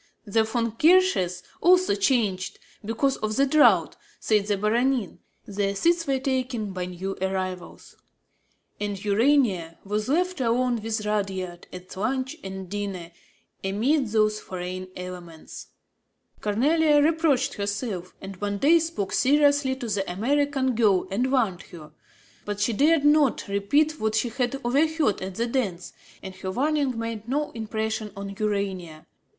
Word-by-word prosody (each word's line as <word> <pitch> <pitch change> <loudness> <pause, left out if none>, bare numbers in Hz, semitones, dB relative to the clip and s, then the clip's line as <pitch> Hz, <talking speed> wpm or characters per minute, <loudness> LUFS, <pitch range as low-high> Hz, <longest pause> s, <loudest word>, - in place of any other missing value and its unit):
The 220 +2 +2
Von 230 +1 -1
Rothkirches 300 - +3 0.2
also 365 - +5
changed, 200 -3 0 0.3
because 230 +6 0
of 215 0 -2
the 275 - +4
draught, 295 +2 +4 0.2
said 210 -2 +1
the 205 -1 +1
Baronin; 235 +1 0 0.3
their 200 0 -2
seats 335 - +1
were 270 -1 +2
taken 255 -5 -2
by 180 -1 -3
new 185 +2 -5
arrivals; 185 -1 -4 0.8
and 205 -1 -3
Urania 205 - +2
was 210 +3 -2
left 360 +1 0
alone 240 0 +1
with 220 -1 -3
Rudyard 190 -4 -3
at 180 0 -10
lunch 260 +8 -2
and 190 -1 -6
dinner, 195 -3 -5 0.5
amid 240 +9 +1
those 215 0 +1
foreign 185 0 -6
elements. 180 -3 -9 0.7
Cornélie 290 +8 +3
reproached 310 -5 +2
herself 200 -3 -4
and 195 -1 -8
one 205 +1 -2
day 315 +9 +5
spoke 320 - -3
seriously 285 -1 +3
to 255 -3 -6
the 200 -3 -2
American 265 +5 +1
girl 205 -6 +2
and 245 +6 0
warned 220 -9 +1
her. 155 -3 -12 0.5
But 205 -1 -4
she 210 +3 +1
dared 295 +5 +3
not 295 -3 +3
repeat 285 +11 +1
what 220 0 0
she 230 +2 +1
had 250 +2 -2
overheard 290 - +1
at 190 0 -5
the 230 - 0
dance; 210 -8 -2 0.3
and 190 - -7
her 190 0 -5
warning 275 +3 0
made 230 -1 -5
no 295 +3 -1
impression 220 -1 -3
on 200 0 -6
Urania. 190 -6 -3
220 Hz, 140 wpm, -25 LUFS, 195-270 Hz, 0.8 s, also